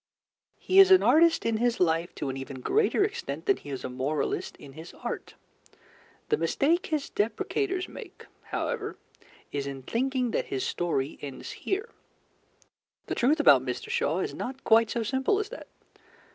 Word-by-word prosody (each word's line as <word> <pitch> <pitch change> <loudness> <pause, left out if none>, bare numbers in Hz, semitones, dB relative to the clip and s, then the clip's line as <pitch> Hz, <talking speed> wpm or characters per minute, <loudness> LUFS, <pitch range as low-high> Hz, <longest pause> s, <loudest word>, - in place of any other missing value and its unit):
He 380 - +3
is 385 -1 +9
an 375 -1 +7
artist 330 +1 +4
in 230 -1 +1
his 240 +1 +1
life 170 0 +1
to 140 - -3
an 130 - -3
even 135 0 -7
greater 420 - +2
extent 410 0 -4
than 400 -2 +3
he - - -12
is 135 -2 -5
a - - -2
moralist 135 +4 -2
in 140 - -12
his 160 +4 -11
art. - - -6 0.9
The 445 - +3
mistake 335 +2 +1
his 305 -3 -1
depreciators 365 - -1
make, - - -11 0.2
however, 435 -3 -3 0.5
is 140 -1 -3
in 135 -1 -6
thinking 250 - -1
that - - -1
his 130 - -3
story 155 -5 -2
ends 140 -3 -7
here. 405 +5 -3 1.2
The - - -3
truth 285 +6 +2
about 300 - +6
Mr. 440 - -4
Shaw 480 - +1
is - - -3
not 265 +2 -6
quite 225 0 +5
so 235 - -1
simple 265 - +1
as 420 0 -2
that. - - -9
245 Hz, 170 wpm, -28 LUFS, -, 1.2 s, is